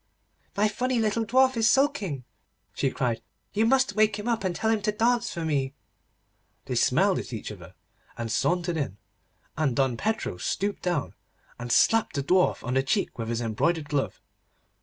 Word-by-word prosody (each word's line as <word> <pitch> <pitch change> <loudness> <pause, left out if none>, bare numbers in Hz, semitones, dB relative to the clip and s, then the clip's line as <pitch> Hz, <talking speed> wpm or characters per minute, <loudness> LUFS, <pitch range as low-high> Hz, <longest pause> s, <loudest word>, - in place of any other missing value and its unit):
'My 210 +1 +4
funny 250 +4 -1
little 225 0 +1
dwarf 260 +2 +4
is 225 -1 +3
sulking,' 220 - +1 0.5
she 135 - 0
cried, 120 -3 -1 0.3
'you 220 +2 +2
must 260 -3 +3
wake 215 -1 +3
him 210 +2 -6
up, 230 -3 0
and 185 -2 -1
tell 220 - +1
him 220 -2 +1
to 210 +1 +1
dance 235 +3 +1
for 165 -1 -4
me.' 140 -3 -1 0.9
They - - -4
smiled - - +3
at - - -7
each - - -5
other, - - -12 0.4
and 115 -1 -4
sauntered 175 - 0
in, 105 -10 -3 0.6
and 145 -6 0
Don 130 -2 +1
Pedro 220 - -2
stooped 200 - -2
down, 175 -1 -1 0.5
and 120 0 -5
slapped 225 - +3
the 140 - -1
Dwarf 180 +5 +2
on 125 - -2
the 135 - +3
cheek 145 - -1
with 115 0 -3
his 115 0 -1
embroidered 145 +8 0
glove. 145 -2 -1
185 Hz, 180 wpm, -26 LUFS, 135-225 Hz, 0.9 s, My